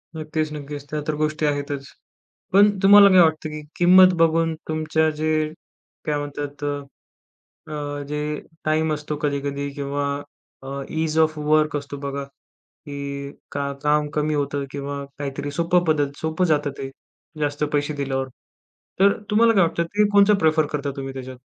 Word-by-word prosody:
नक्कीच, 155 0 -2
नक्कीच. 145 -1 -7
त्या 150 - -2
तर 155 - 0
गोष्टी 155 +1 -1
आहेतच. 145 -1 -2 0.7
पण 205 +2 +7
तुम्हाला 200 0 +9
काय 185 -1 +7
वाटतं 155 -1 +2
की 155 0 -6 0.2
किंमत 185 +1 +7
बघून 165 0 +3
तुमच्या 155 0 +1
जे 155 0 0 0.8
काय 150 -1 0
म्हणतात, 145 0 -6
अ, 145 -1 -5 0.7
अ, 145 -1 -4
जे 150 0 -3 0.2
टाइम 155 0 +1
असतो 150 0 -5
कधी-कधी 140 -1 -2
किंवा 140 0 -2 0.6
अ, 135 - -9 0.2
इझ 160 0 -1
ऑफ 155 -1 +3
वर्क 155 0 +2
असतो 145 0 -5
बघा. 140 0 -4
की 140 0 -9 0.2
का 140 0 -2
काम 150 0 +2
कमी 150 0 0
होतं 145 -1 -1
आहे 140 - -3
किंवा 140 0 -5
काहीतरी 140 0 -4
सोपं 170 +3 +1
पद्धत 145 -4 +1
सोपं 160 +3 0
जातं 150 -3 +1
ते 135 - -5 0.5
जास्त 145 0 0
पैसे 145 +1 0
दिल्यावर. 135 -2 -2 0.7
तर 200 +1 +6 0.2
तुम्हाला 230 +2 +5
काय 195 - +5
वाटतं? 170 0 +1
ते 205 +5 +1
कोणचं 205 +1 +6
प्रेफर 155 -2 +3
करता 140 -1 -1
तुम्ही 135 -1 -5
त्याच्यात? 130 -1 -8
150 Hz, 155 wpm, -23 LUFS, 140-160 Hz, 0.8 s, तुम्हाला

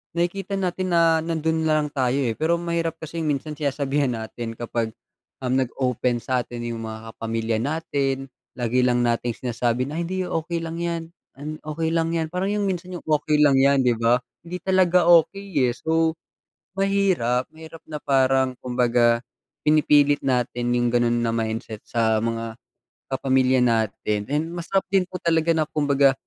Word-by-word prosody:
nakikita 190 +3 -1
natin 185 -1 -1
na 165 -1 +4
nandun 160 0 -1
na 155 -1 +3
lang 150 - -5
tayo 130 -3 0
eh, 120 - 0
pero 160 +7 +1
mahirap 170 -1 -2
kasing 160 0 -5
minsan 150 +1 -2
sinasabihan 140 -2 0
natin 115 +1 -6
kapag, 115 -1 -3 0.5
um, 125 - -1
nag-open 125 -2 0
satin 120 -1 -2
yung 120 -1 -4
mga 110 0 -8
pamilya 115 0 -1
natin 135 -1 -2 0.2
lagi 125 0 +1
lang 125 -1 +2
nating 120 0 0
sinasabi 120 +2 -1
na, 155 - -5
"Hindi 185 +2 -2
okey 165 +1 -2
lang 165 0 -5
yan, 170 -1 -2 0.6
okey 160 +1 -2
lang 165 0 0
yan," 160 -1 -1
parang 185 +4 -1
yung 205 -1 0
minsan 180 0 -4
yung - - -6
okey 150 -1 +1
lang 140 -2 +5
yan 140 0 +4
di 125 - +4
ba, 115 +1 +4 0.3
hindi 180 +2 -4
talaga 180 -2 +3
okey, 170 -4 +3
eh, 120 - -1
so, 160 +1 +1 0.6
mahirap 190 -11 +1
mahirap 160 0 -12
na 155 - -4
parang 130 -2 +2
kumbaga 120 -1 +2 0.5
pinipilit 145 -1 +4
natin 125 -2 0
yung 120 -1 +1
ganun 120 -1 +2
na 115 - +1
mindset 110 -1 -3
sa 110 -2 +1
mga 115 0 -3 0.6
kapamilya 130 -1 +2
natin. 105 -3 0
And 155 +4 -1
masarap 175 +3 -1
din 190 -2 +3
po 185 - -6
talaga 165 -1 +1
na 155 - +2
kumbaga 140 -2 +3
140 Hz, 160 wpm, -23 LUFS, 120-165 Hz, 0.6 s, lang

